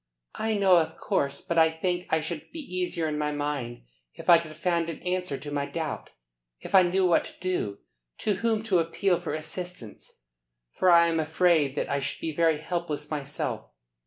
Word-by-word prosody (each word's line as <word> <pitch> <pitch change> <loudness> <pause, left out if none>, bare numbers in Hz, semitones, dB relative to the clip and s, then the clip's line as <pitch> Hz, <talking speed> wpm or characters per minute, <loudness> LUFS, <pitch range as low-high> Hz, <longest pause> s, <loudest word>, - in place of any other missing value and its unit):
"I 220 0 -1
know, 195 -3 +5
of 160 -2 0
course. 140 0 -1
But 170 -1 0
I 160 0 +6
think 175 +2 -2
I 160 - +2
should 160 0 -5
be - - -9
easier 180 - -2
in 150 -1 -2
my 150 0 0
mind 145 - -3 0.3
if - - +1
I 170 - +9
could 160 -2 -8
find 170 0 0
an 165 - -5
answer 180 -5 -1
to 145 +1 -8
my 140 -1 -1
doubt. 160 -3 -4 0.5
If - - -10
I 190 - +9
knew 185 +1 +2
what 175 -2 +4
to - - -12
do, 175 - -2 0.4
to 210 - 0
whom 225 -1 0
to 195 -6 +2
appeal 175 +2 +1
for 175 - -3
assistance, 155 - -8 0.5
for 185 - +2
I 170 -1 +7
am 165 -1 +1
afraid 160 -3 +2
that - - -1
I 140 - 0
should 135 - -3
be 160 - -3
very 165 0 +3
helpless 160 -2 -4
myself. 145 -1 -4
165 Hz, 195 wpm, -27 LUFS, 150-180 Hz, 0.5 s, I